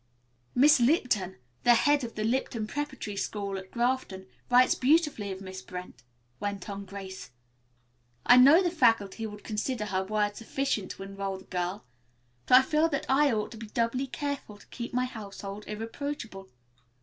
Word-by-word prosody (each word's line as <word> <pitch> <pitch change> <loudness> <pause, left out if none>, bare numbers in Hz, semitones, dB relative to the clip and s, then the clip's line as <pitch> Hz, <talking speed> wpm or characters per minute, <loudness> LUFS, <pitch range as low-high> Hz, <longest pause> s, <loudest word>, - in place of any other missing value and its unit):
"Miss 295 +3 +6
Lipton, 235 - +2 0.3
the 240 0 +6
head 290 +3 +3
of 230 - -6
the 215 - -2
Lipton 230 -1 -1
Preparatory 265 -4 -5
School, 200 0 -3
at 190 0 -12
Grafton, 235 -6 -1 0.2
writes 250 +1 +6
beautifully 275 -7 +2
of 190 0 -7
Miss 190 -1 -7
Brent," 180 -10 -9 0.4
went 200 -2 -4
on 200 0 -6
Grace. 190 -3 -8 1.0
"I 245 - +8
know 285 +9 +8
the 350 - +1
faculty 225 - +2
would 210 -1 -10
consider 215 +1 -2
her 190 -2 -1
word 205 +1 0
sufficient 225 -3 -2
to 195 - -9
enroll 195 0 -4
this 190 - -16
girl, 180 +3 -3 0.6
but 250 - +8
I - - +8
feel 310 +4 +2
that 280 - -2
I 280 +1 +4
ought 215 -2 -1
to 225 - -9
be 225 0 -8
doubly 235 +5 -1
careful 265 -4 -5
to - - -18
keep 240 0 -6
my 250 +1 +1
household 205 -3 -8
irreproachable. 225 -2 -6
220 Hz, 165 wpm, -28 LUFS, 195-260 Hz, 1.0 s, I